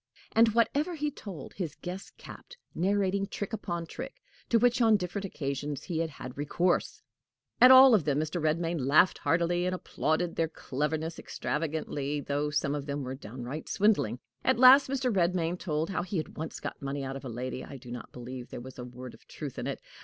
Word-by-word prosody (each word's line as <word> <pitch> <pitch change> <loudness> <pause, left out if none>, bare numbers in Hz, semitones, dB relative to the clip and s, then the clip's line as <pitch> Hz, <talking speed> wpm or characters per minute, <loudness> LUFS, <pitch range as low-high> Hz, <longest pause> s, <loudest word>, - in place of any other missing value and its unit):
And 225 0 +4
whatever 290 +9 +2
he 300 -1 -1
told, 190 - -9
his 170 -6 -4
guest 185 +2 -8
capped, 485 - -12 0.2
narrating 195 +1 +1
trick 205 +2 -5
upon 175 -5 -3
trick 255 +10 -7 0.3
to 235 - +5
which 245 +2 +3
on 225 -2 +6
different 195 +2 -4
occasions 140 -4 -4
he 170 -4 -3
had 165 -1 0
had 130 -4 -9
recourse. 175 +5 0 0.6
At 250 - +10
all 260 0 +10
of 205 -7 +4
them 145 -2 +1
Mr. 155 +3 -2
Redmain 165 +2 0
laughed 150 +7 +4
heartily, 175 +1 +1
and 185 - 0
applauded 170 -1 -1
their 165 - +2
cleverness 160 +2 -3
extravagantly, 150 -2 -3
though 145 +1 -1
some 145 -1 0
of 145 -1 -4
them 140 0 -3
were 130 0 -4
downright 130 +3 -7
swindling. 200 - +2 0.3
At 260 - +3
last 260 +2 +8
Mr. 255 -4 0
Redmain 175 -1 +1
told 155 +2 -1
how 190 - -1
he 185 +2 -3
had 155 - -4
once 160 +1 -5
got - - -6
money 140 0 -3
out 135 0 -4
of 135 - -7
a 130 - -5
lady. 125 +2 -4
I 140 - -9
do 125 -1 -11
not 125 - -7
believe 125 0 -8
there - - -6
was 130 +1 -10
a - - -4
word 125 0 -9
of - - -18
truth - - -7
in - - -3
it. - - -3
165 Hz, 200 wpm, -29 LUFS, 140-200 Hz, 0.6 s, At